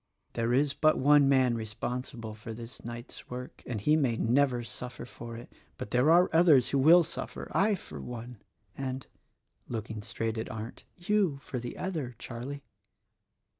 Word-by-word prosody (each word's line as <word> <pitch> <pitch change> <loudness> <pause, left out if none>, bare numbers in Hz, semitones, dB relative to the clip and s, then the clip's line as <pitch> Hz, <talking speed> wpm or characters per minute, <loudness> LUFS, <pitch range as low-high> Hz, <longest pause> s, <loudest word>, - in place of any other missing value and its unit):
There 115 0 0
is 140 +3 +3
but 155 +2 +3
one 145 0 +5
man 130 -3 +4
responsible 115 +1 -4
for 110 +1 -8
this 115 +1 -8
night's 120 +1 -8
work 125 +1 -7
— - - -35
and 115 -3 -2
he 150 +10 +3
may 130 -7 +2
never 125 +1 +2
suffer 125 +1 -6
for 115 -1 -9
it. 120 - -11 0.2
But 125 -4 -6
there 125 +5 +4
are 175 +2 +6
others 155 -7 +6
who 140 - +1
will 165 +6 +7
suffer: - - -6
I 205 +2 +3
for 75 - -9
one, 120 - -8 0.3
and," 130 -1 -4 0.6
looking 110 -2 -4
straight 115 +2 -3
at 110 - -4
Arndt, 110 +1 -7
"you, 185 -4 +1
for 125 - -4
the 120 0 -6
other, 155 -10 -3
Charlie." 130 +5 -6
125 Hz, 170 wpm, -30 LUFS, 115-145 Hz, 0.6 s, will